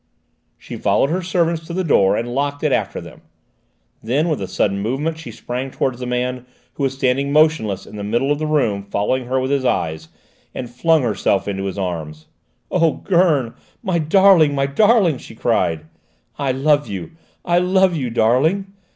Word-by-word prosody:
She - - -9
followed 140 - +1
her 185 +3 0
servants 170 -2 0
to 170 - -6
the 185 +1 -1
door 100 - +3
and 120 +1 -3
locked 145 +2 -2
it - - +2
after - - -1
them. - - -12 0.8
Then 140 +9 0
with 155 - -1
a - - -3
sudden 100 -1 0
movement 140 +10 -2
she 165 - -9
sprang 125 +2 -5
towards 130 -1 -2
the 125 - -5
man, 125 0 -2 0.3
who - - -8
was 135 -1 0
standing 135 +1 0
motionless 150 - +2
in - - -11
the 100 - -5
middle 120 +7 0
of 145 - 0
the 155 - -2
room 130 -10 +1
following 120 +6 -1
her 130 +1 0
with 130 +1 -2
his 140 -2 +1
eyes, 80 -9 -1 0.5
and 125 -2 -6
flung 160 +4 +2
herself 100 -3 0
into 100 -1 -3
his 95 0 -4
arms. 80 -5 -5 0.5
"Oh, 165 -4 +2
Gurn, 165 - +1 0.3
my 185 -5 0
darling, 165 -2 +5
my 135 0 +1
darling!" 185 - +3
she - - -12
cried. 90 -10 0 0.5
"I 140 -2 0
love 145 +3 +2
you! 95 -4 -6 0.3
I 175 0 +3
love 185 0 +2
you, 130 -6 -2
darling!" 150 - +1
135 Hz, 185 wpm, -19 LUFS, 115-160 Hz, 0.8 s, darling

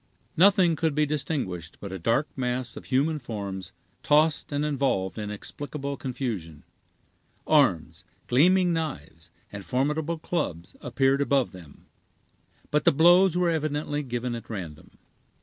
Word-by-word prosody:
Nothing 185 -2 +5
could 160 -1 -1
be 150 0 +3
distinguished 135 - -3
but 100 - -7
a 95 - -5
dark 115 - +1
mass 125 -2 -2
of - - -9
human 150 +4 +1
forms 100 -7 -6 0.3
tossed 150 +1 +2
and 145 +1 -1
involved 130 - -1
in 105 - -3
inexplicable 140 +7 -6
confusion. 115 - -5 0.8
Arms, 85 - +2 0.2
gleaming 180 +7 +4
knives, 85 - -5 0.2
and 105 -1 -7
formidable 150 - -1
clubs, 90 - -4
appeared 135 +3 +1
above 140 -3 +1
them, 85 -7 -14 0.9
but 150 - +2
the - - +5
blows 175 +4 +5
were 180 -1 +2
evidently 150 -1 -2
given 125 -2 -3
at 115 -1 -7
random. 85 -8 -8
135 Hz, 130 wpm, -26 LUFS, 105-150 Hz, 0.9 s, Nothing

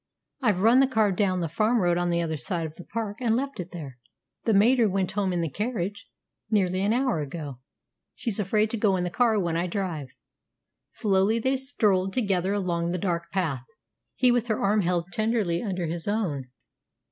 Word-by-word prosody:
I've 210 -7 +2
run 230 +5 +6
the 270 - +5
car 220 -5 +2
down 185 -1 +1
the 165 - -1
farm 215 +9 +1
road 175 -3 +2
on 175 0 0
the 170 0 +1
other 160 -1 -2
side 165 +5 0
of 155 - -7
the 180 - -11
park, 215 0 -4
and 230 -2 +2
left 275 0 -3
it 180 0 -5
there. 140 -9 -8 0.5
The 225 - +3
mater 230 +2 +5
went 190 -1 -1
home 195 -1 0
in 175 -1 0
the 165 - 0
carriage 205 - -3 0.4
nearly 190 -3 +1
an 200 +2 +2
hour 250 -6 +1
ago. 145 -3 -6 0.6
She's 225 -4 -1
afraid 210 +2 +1
to 230 - -2
go 205 -3 +2
in 180 - -1
the 175 - -2
car 230 0 +2
when 170 -3 -1
I 170 +2 0
drive." 175 -7 -3 0.8
Slowly 200 0 +1
they 260 +4 +1
strolled 210 -8 +1
together 195 -6 +1
along 175 -4 -1
the 180 - -1
dark 170 -2 -2
path, 155 -10 -1 0.5
he 250 -1 +4
with 240 -1 +1
her 215 -2 0
arm 205 +1 +2
held 175 0 -1
tenderly 215 -6 0
under 185 -6 -2
his 165 +2 -4
own. 180 - -1
195 Hz, 200 wpm, -26 LUFS, 175-220 Hz, 0.8 s, run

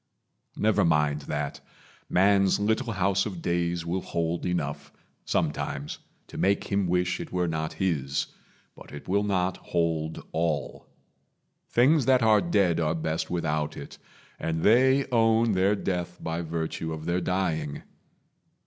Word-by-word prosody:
Never 110 0 +2
mind 75 -2 +2
that. 75 -1 -3 0.5
Man's 95 +1 +4
little 110 +3 0
house 95 +1 +1
of 95 -5 -6
days 85 -1 -1
will 90 +3 -1
hold 85 0 -2
enough, 80 -5 -3 0.3
Sometimes, 75 -2 -2 0.3
to - - -9
make 100 +1 +2
him 100 -2 +1
wish 90 0 0
it - - -7
were 90 -1 0
not 80 -1 -2
his, 70 -7 -1 0.5
But - - -14
it 75 - -9
will 100 +2 +2
not 95 -3 0
hold 80 -2 -2
all. 80 -2 -2 0.8
Things 135 +2 +4
that 130 -2 +4
are 110 -2 +5
dead 85 -1 +2
Are 80 0 +1
best 80 0 -2
without 75 -3 -1
it, - - -9 0.4
and 80 0 -2
they 130 +5 +5
own 115 -1 +3
their 95 +1 +3
death 90 -3 -3
By 80 +1 -3
virtue 80 0 -3
of 80 0 -7
their 85 +1 0
dying. 85 -6 -1
90 Hz, 140 wpm, -27 LUFS, 80-100 Hz, 0.8 s, are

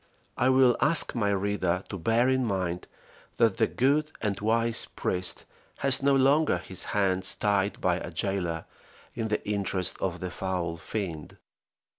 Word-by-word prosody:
I 130 - +2
will 130 -2 +5
ask 145 -4 +3
my 105 -4 0
reader 95 -2 0
to 100 - -5
bear 115 +7 +2
in 130 0 +2
mind, 95 -5 -2 0.5
that 115 -5 +3
the 110 - +3
good 150 +4 +1
and 105 -3 -2
wise 115 +2 +2
priest 90 0 -3 0.3
has 135 -1 0
no 140 0 +4
longer 140 +4 +4
his 95 - -8
hands 95 -2 +1
tied 100 -1 0
by 90 -1 +1
a 90 - -6
jailer 85 -1 -2 0.5
in 110 - -2
the 105 -1 -2
interest 95 -3 -1
of 90 -2 -2
the 90 -1 -4
foul 90 -2 -3
fiend. 85 -5 -5
100 Hz, 155 wpm, -28 LUFS, 90-120 Hz, 0.5 s, will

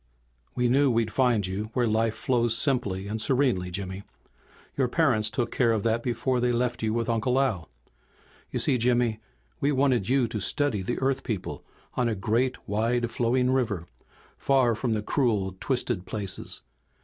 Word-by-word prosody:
"We 125 0 +2
knew 135 +3 +4
we'd 115 -3 0
find 120 -5 +2
you 100 +3 -3
where 125 -2 +1
life 110 0 +1
flows 120 -3 +1
simply 110 -9 0
and 110 +2 -2
serenely, 125 -10 +1
Jimmy. 95 +1 -5 0.7
Your 135 -2 +1
parents 120 -7 +2
took 115 +2 -2
care 120 -3 +2
of 110 -3 0
that 115 0 +1
before 125 +1 -1
they 125 0 +2
left 120 0 -1
you 110 -1 0
with 115 +1 -1
Uncle 120 +3 +1
Al. 105 - -1 0.8
"You - - -3
see, 125 - +2
Jimmy, 120 -2 +2 0.4
we 140 - +1
wanted 130 -6 +2
you 130 -2 +3
to 105 - -3
study 110 +2 +1
the 120 +6 -2
Earth 135 0 0
people 105 -7 -4 0.3
on 120 -1 +1
a 110 - -1
great, 120 +5 -1
wide 115 +3 0
flowing 125 +2 +1
river, 110 -10 0 0.5
far 130 -4 +3
from 115 0 -1
the 105 - -2
cruel, 105 -8 0
twisted 120 -8 -1
places. 100 -3 -5
120 Hz, 170 wpm, -27 LUFS, 110-125 Hz, 0.8 s, knew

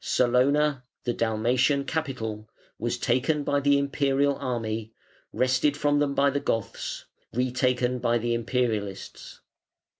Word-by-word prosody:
Salona, 130 +3 +2 0.2
the 120 - -1
Dalmatian 120 +5 +1
capital, 115 -9 -4 0.3
was - - -1
taken 145 +4 +1
by 145 0 +1
the 140 0 +3
Imperial 140 0 +1
army, 115 -3 -3 0.4
wrested 130 +3 +1
from 145 -1 +2
them 140 -1 0
by 140 0 +3
the 140 - 0
Goths, 115 -5 -3 0.3
retaken 125 0 0
by 120 -1 +2
the 120 +1 -1
Imperialists. 115 -4 -3
125 Hz, 120 wpm, -26 LUFS, 115-140 Hz, 0.4 s, the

